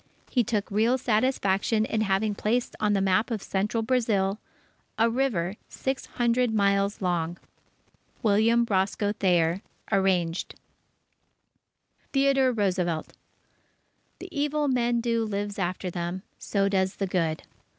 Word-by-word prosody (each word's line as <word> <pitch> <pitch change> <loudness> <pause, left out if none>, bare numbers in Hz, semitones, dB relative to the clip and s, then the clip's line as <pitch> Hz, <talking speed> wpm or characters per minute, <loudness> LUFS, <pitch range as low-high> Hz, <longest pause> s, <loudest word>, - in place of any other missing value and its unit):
He 245 - +3
took 210 -2 -2
real 225 +5 +3
satisfaction 220 -3 +1
in 220 - -1
having 205 +1 +1
placed 230 +4 -1
on 210 -1 +2
the 195 - +2
map 195 +4 +2
of 220 -4 -3
Central 210 +4 -1
Brazil, 220 -5 +1 0.6
a 230 +1 +3
river 215 -7 0
six 265 0 -3
hundred 240 0 +1
miles 200 -1 +1
long. 175 -1 -1 0.9
William 225 +2 +4
Roscoe 200 +1 +1
Thayer 175 -3 +2 0.3
(Arranged) 185 -4 +1 1.6
THEODORE 270 -1 +3
ROOSEVELT 180 -7 -1 1.0
The 370 - -9
evil 295 -1 0
men 240 -2 +1
do 230 -1 0
lives 205 -1 -3
after 180 0 -2
them; 175 +2 -4 0.2
so 200 -1 0
does 190 -1 +1
the 195 - -1
good. 165 -4 -1
205 Hz, 120 wpm, -26 LUFS, 190-235 Hz, 1.6 s, William